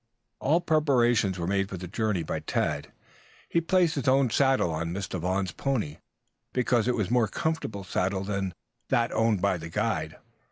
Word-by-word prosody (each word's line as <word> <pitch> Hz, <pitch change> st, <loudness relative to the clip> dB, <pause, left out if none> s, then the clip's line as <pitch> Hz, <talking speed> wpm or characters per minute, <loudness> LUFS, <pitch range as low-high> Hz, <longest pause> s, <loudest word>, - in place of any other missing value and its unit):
All 160 Hz, +6 st, +2 dB
preparations 120 Hz, -, +2 dB
were 85 Hz, -, -2 dB
made 95 Hz, +1 st, 0 dB
for 95 Hz, -, -5 dB
the 90 Hz, +1 st, -6 dB
journey 105 Hz, -2 st, -1 dB
by -, -, -3 dB
Tad. 75 Hz, -1 st, -2 dB, 0.6 s
He 170 Hz, -, +1 dB
placed 175 Hz, -1 st, +3 dB
his 140 Hz, -3 st, -3 dB
own 130 Hz, -2 st, +4 dB
saddle 135 Hz, -10 st, +3 dB
on 85 Hz, +1 st, -2 dB
Mr. 95 Hz, -1 st, -3 dB
Vaughn's 95 Hz, +2 st, -1 dB
pony, 110 Hz, -, -2 dB, 0.6 s
because 125 Hz, -2 st, +2 dB
it 125 Hz, -, +2 dB
was 105 Hz, -5 st, -1 dB
a -, -, -1 dB
more 120 Hz, -3 st, +4 dB
comfortable 160 Hz, -12 st, -2 dB
saddle 95 Hz, +1 st, -1 dB
than 100 Hz, -2 st, -2 dB, 0.3 s
that 115 Hz, 0 st, +1 dB
owned 110 Hz, -4 st, +1 dB
by 100 Hz, -2 st, +2 dB
the 80 Hz, 0 st, -7 dB
guide. 80 Hz, -5 st, -1 dB
105 Hz, 175 wpm, -27 LUFS, 90-130 Hz, 0.6 s, own